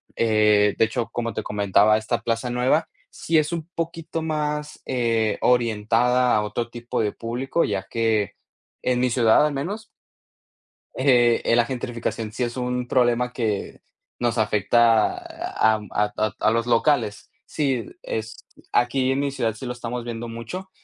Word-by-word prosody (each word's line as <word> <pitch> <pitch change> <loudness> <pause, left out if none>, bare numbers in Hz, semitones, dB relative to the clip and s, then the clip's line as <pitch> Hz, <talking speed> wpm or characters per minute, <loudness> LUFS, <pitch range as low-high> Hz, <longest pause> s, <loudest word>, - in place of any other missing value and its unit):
Eh, 105 -2 +3
de 115 - +5
hecho, 115 +1 -3
como 115 -2 -3
te 110 - -3
comentaba, 105 +1 +3
esta 110 +1 -2
plaza 115 +2 -1
nueva 130 +6 +2 0.2
sí 165 -1 +1
es 155 +1 -1
un 170 -1 -4
poquito 165 -1 -4
más, 150 -1 -3
eh, 115 -4 0
orientada 120 +1 +2
a 105 - +2
otro 115 +3 -3
tipo 120 0 -3
de 105 -2 0
público, 125 +8 -1
ya 95 -2 -2
que, 110 -3 0 0.5
en 125 -1 +1
mi 125 - +2
ciudad 115 +3 +4
al 150 - -1
menos 195 +11 -4 1.1
eh, 120 -3 +3
eh, 115 - +3
la 120 - +4
gentrificación 115 -3 -4
sí 125 - -4
es 120 +1 -5
un 125 0 -2
problema 125 -1 +2
que 110 -5 -3 0.4
nos 120 -1 0
afecta 110 +1 +3
a 110 0 0
am 105 -2 -6
a 105 0 +1
to 110 -1 -1
a - - +3
los 115 +1 0
locales. 120 -3 +1 0.2
Sí, 135 -6 -1 0.2
es 110 0 -5 0.3
aquí 130 +2 +2
en 135 - 0
mi 140 -1 0
ciudad 115 -5 -1
sí 115 - -9
lo 125 - -2
estamos 120 0 -5
viendo 120 0 -5
mucho. 115 +12 -7
120 Hz, 165 wpm, -23 LUFS, 110-130 Hz, 1.1 s, de